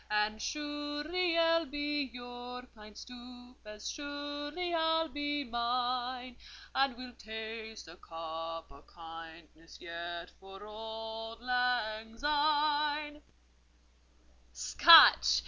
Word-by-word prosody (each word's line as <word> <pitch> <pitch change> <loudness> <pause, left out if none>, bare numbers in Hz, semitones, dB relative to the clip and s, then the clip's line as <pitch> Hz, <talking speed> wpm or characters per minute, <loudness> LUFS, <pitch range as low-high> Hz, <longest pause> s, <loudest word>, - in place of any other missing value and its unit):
"And 210 +1 +1
surely 295 +4 -2
ye'll 330 -1 +3
be 290 0 -2
your 245 0 -8
pint 210 -1 -14
stoup, 245 0 -11
And 210 -1 -10
surely 290 +6 -4
I'll 325 0 +2
be 290 0 -2
mine; 245 +1 -2 0.4
And 270 -2 +2
we'll 250 -1 -8
taste 220 -1 -7
a 165 +2 -12
cup 165 -1 -6
o' 140 +1 -15
kindness 165 -1 -12
yet 170 0 -6
For 195 +1 -11
auld 225 +1 -7
lang 240 -3 0
syne." 295 +1 +1 1.3
"Scotch! - - +8
245 Hz, 95 wpm, -32 LUFS, 215-290 Hz, 1.3 s, Scotch